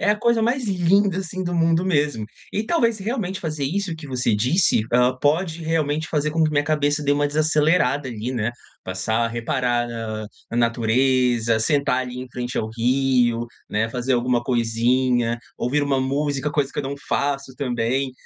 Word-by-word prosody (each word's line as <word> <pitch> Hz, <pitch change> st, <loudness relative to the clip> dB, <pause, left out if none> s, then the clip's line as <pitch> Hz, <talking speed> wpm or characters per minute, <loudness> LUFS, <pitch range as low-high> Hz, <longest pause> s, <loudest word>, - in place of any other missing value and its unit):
É -, -, +1 dB
a 210 Hz, -, +4 dB
coisa 235 Hz, 0 st, +2 dB
mais 245 Hz, +3 st, +1 dB
linda, 190 Hz, 0 st, +2 dB
assim, 185 Hz, 0 st, -4 dB
do 175 Hz, 0 st, -2 dB
mundo 165 Hz, +1 st, +2 dB
mesmo. 145 Hz, -, 0 dB, 0.3 s
E 210 Hz, -, -1 dB
talvez 230 Hz, -5 st, +2 dB
se 200 Hz, -, -9 dB
realmente 200 Hz, -4 st, -2 dB
fazer 155 Hz, -6 st, -3 dB
isso 180 Hz, +4 st, -2 dB
que 160 Hz, -2 st, -10 dB
você 125 Hz, -4 st, 0 dB
disse, 125 Hz, -, +2 dB
ah, 125 Hz, +1 st, +4 dB
pode 165 Hz, +3 st, +1 dB
realmente 155 Hz, -1 st, -1 dB
fazer 150 Hz, -1 st, 0 dB
com 165 Hz, +1 st, +1 dB
que 155 Hz, -, +3 dB
minha 145 Hz, -1 st, +1 dB
cabeça 145 Hz, 0 st, +1 dB
dê 145 Hz, -, +3 dB
uma 145 Hz, 0 st, +2 dB
desacelerada 150 Hz, -2 st, +2 dB
ali, 120 Hz, +1 st, -4 dB
né. 115 Hz, -1 st, -1 dB, 0.3 s
Passar 95 Hz, +5 st, -2 dB
a -, -, -3 dB
reparar, 120 Hz, +1 st, -1 dB
ah, 110 Hz, -2 st, -4 dB, 0.3 s
a 115 Hz, -, -3 dB
natureza, 120 Hz, 0 st, +2 dB
sentar 140 Hz, +1 st, +1 dB
ali 125 Hz, -1 st, -5 dB
em 130 Hz, -, -7 dB
frente 125 Hz, +1 st, -5 dB
ao 110 Hz, -, -1 dB
rio, 125 Hz, -1 st, +2 dB, 0.3 s
né, 110 Hz, +2 st, 0 dB
fazer 125 Hz, +2 st, 0 dB
alguma 120 Hz, 0 st, +1 dB
coisinha, 120 Hz, 0 st, +1 dB, 0.2 s
ouvir 140 Hz, +4 st, 0 dB
uma 140 Hz, -2 st, +1 dB
música, 140 Hz, +2 st, -1 dB
coisa 145 Hz, -2 st, -1 dB
que -, -, -6 dB
eu -, -, 0 dB
não 135 Hz, +1 st, -4 dB
faço 140 Hz, -1 st, -1 dB
também. 130 Hz, +1 st, -1 dB
135 Hz, 185 wpm, -22 LUFS, 120-160 Hz, 0.3 s, a